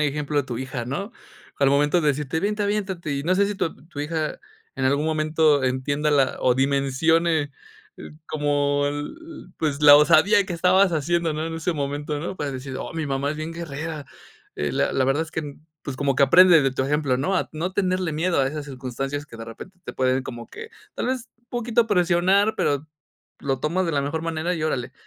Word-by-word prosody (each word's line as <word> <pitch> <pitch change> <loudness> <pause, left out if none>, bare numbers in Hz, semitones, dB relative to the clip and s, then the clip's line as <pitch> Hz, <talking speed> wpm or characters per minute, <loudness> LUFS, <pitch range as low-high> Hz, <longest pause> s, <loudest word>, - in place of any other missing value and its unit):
ejemplo 150 0 0
a 140 - -1
tu 120 - -4
hija, 130 -1 -5
¿no?, 195 - -4 0.5
al 140 - +4
momento 145 +5 +3
de 150 - +2
decirte, 145 +2 -1
vente 210 +2 -1
aviéntate, 190 -6 -2
y 140 0 -2
no 185 +2 +2
sé 200 +1 +3
si 205 - -3
tu 170 -4 -2
tu 145 -4 -7
hija 155 +1 -3 0.3
en 135 -1 0
algún 140 +3 +1
momento 155 -2 +2
entienda 145 +4 0
la 140 -3 +2
o 125 - +3
dimensione 145 +4 +1 0.7
como 145 -1 0
el 185 - -7
pues 150 -2 -1
la 145 0 +10
osadía 170 +8 +5
que 175 - -4
estabas 185 +2 +4
haciendo, 165 +1 0
¿no?, 155 +1 -3
en 165 - -5
ese 165 +1 -2
momento, 145 +1 -3
¿no?, 170 +4 -5
para 145 - -2
decir: 130 0 -6
"Oh - - -6
mi 160 -2 -2
mamá 140 +1 -1
es - - -8
bien 155 +1 -5
guerrera," 160 -2 -6 0.5
eh, 75 -2 -2
la - - +1
la 130 - +2
verdad 135 +4 +1
es 160 - -13
que 150 -4 -5 0.3
pues 140 - -5
como 140 -1 +1
que 140 - +4
aprende 170 +2 +7
de 135 - +2
tu 130 - -1
ejemplo, 145 -3 0
¿no?, 185 +8 0
a - - -2
no 170 +4 -3
tenerle 185 -4 0
miedo 170 0 +1
a 135 - +2
esas 150 0 -5
circunstancias 135 +2 -5
que 115 - -12
de 115 - -7
repente 180 +11 -11
te - - -6
pueden 130 0 +1
como 120 -2 -8
que 455 0 -10 0.2
tal - - -2
vez 255 -2 -3 0.2
poquito 235 -1 +1
presionar 190 +2 +3
pero 145 +2 0 0.5
lo 135 -2 -1
tomas 180 +5 0
de 165 - -1
la 140 - +1
mejor 145 +3 -3
manera, 165 +2 -2
y 160 - -4
órale, 135 -6 -2
150 Hz, 210 wpm, -23 LUFS, 140-170 Hz, 0.7 s, la